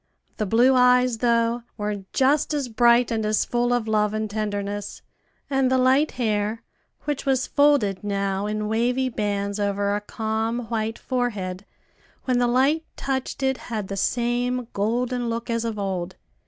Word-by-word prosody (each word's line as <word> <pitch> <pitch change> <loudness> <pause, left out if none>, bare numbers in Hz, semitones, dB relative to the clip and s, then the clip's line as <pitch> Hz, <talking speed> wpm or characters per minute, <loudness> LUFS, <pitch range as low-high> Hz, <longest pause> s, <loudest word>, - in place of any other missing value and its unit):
The 215 - -1
blue 240 +6 +4
eyes, 250 -2 +4
though, 235 0 +2 0.2
were 205 -2 -3
just 285 +3 +2
as 280 -4 -2
bright 235 +1 +4
and 220 -1 0
as 215 0 +1
full 240 0 0
of 245 -2 0
love 210 -1 +1
and 215 0 -1
tenderness; 205 -1 -4 0.4
and 270 -2 +1
the 260 - +3
light 260 +4 +3
hair, 215 -2 -1 0.4
which 295 -2 -3
was 265 -1 +2
folded 285 -10 +2
now 200 0 -1
in 210 0 -2
wavy 245 +4 +1
bands 205 -2 -2
over 200 0 0
a 205 - -2
calm 220 +2 -2
white 225 -1 -2
forehead, 205 -7 -3 0.6
when 255 -2 +1
the 245 - +3
light 270 +6 +2
touched 270 0 -3
it, 265 -1 +1
had 215 -4 -3
the 195 - -3
same 240 +3 0
golden 240 +4 -1
look 230 +1 -3
as 230 0 0
of 225 -2 -3
old. 190 -2 -3
230 Hz, 160 wpm, -24 LUFS, 210-250 Hz, 0.6 s, blue